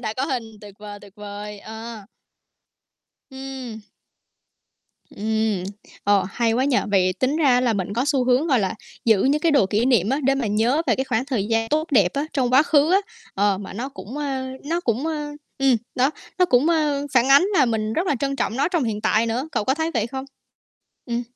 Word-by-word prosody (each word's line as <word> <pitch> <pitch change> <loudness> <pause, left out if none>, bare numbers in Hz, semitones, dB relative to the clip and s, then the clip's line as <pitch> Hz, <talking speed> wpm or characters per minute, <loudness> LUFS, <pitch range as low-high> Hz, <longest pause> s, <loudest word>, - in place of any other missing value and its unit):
đã 220 -1 -3
có 265 - 0
hình 260 -5 -2 0.2
tuyệt 205 -2 -12
vời, 205 -1 -9
tuyệt 200 -2 -15
vời, 205 0 -8
ờ. 220 -1 -9 1.3
Ừm. 265 -4 -7 1.3
Ừm, 220 -2 -1 0.4
ờ, 205 -1 +3
hay 230 -2 +1
quá 255 +3 +1
nhỉ? 270 -3 +2
Vậy 185 -2 +3
tính 265 +3 +1
ra 255 -5 +4
là 240 -3 +2
mình 200 -1 -3
có 245 +4 0
xu 280 -3 +1
hướng, 255 +6 +2
gọi 260 -5 +3
là, 195 +1 -1 0.3
giữ 220 -4 +4
những 285 +3 +2
cái 330 -1 +3
đồ 275 -9 +4
kỷ 210 +4 0
niệm 230 -6 +3
á, 270 +3 +1
để 270 +1 +3
mà 250 -5 -1
nhớ 230 +9 +2
về - - +3
cái 265 - -1
khoảng 255 0 -1
thời 225 -7 -2
gian 225 0 0
tốt 310 +2 0
đẹp 200 -9 +4
á, 285 +2 -1
trong 260 -4 +1
quá 275 - +7
khứ 305 +1 +3
á, 380 - +6 0.4
ờ, 200 -1 +1
mà 195 -2 -8
nó 245 +7 -4
cũng, 270 -1 -9
a, 270 -3 -3 0.2
nó 335 +3 -1
cũng, 255 +3 -1
a, 300 -2 -3 0.3
ừm, 270 -2 +4 0.2
đó, 265 +3 +2 0.3
nó 360 - +6
cũng, 265 0 +3
a, 310 -3 +2 0.2
phản 250 0 +4
ánh 280 +5 +7
là 290 -7 +4
mình 220 -2 -1
rất 360 +3 -1
là 290 - +2
trân 275 -1 -1
trọng 235 - -2
nó 280 - +2
trong 340 -5 0
hiện 215 -3 -2
tại 220 +2 +2
nữa, 245 +6 -2
cậu - - -1
có 265 - +2
thấy 320 +3 -2
vậy 225 -1 0
không? 265 +2 -6 0.8
Ừm. 240 -1 -2
250 Hz, 220 wpm, -22 LUFS, 215-275 Hz, 1.3 s, quá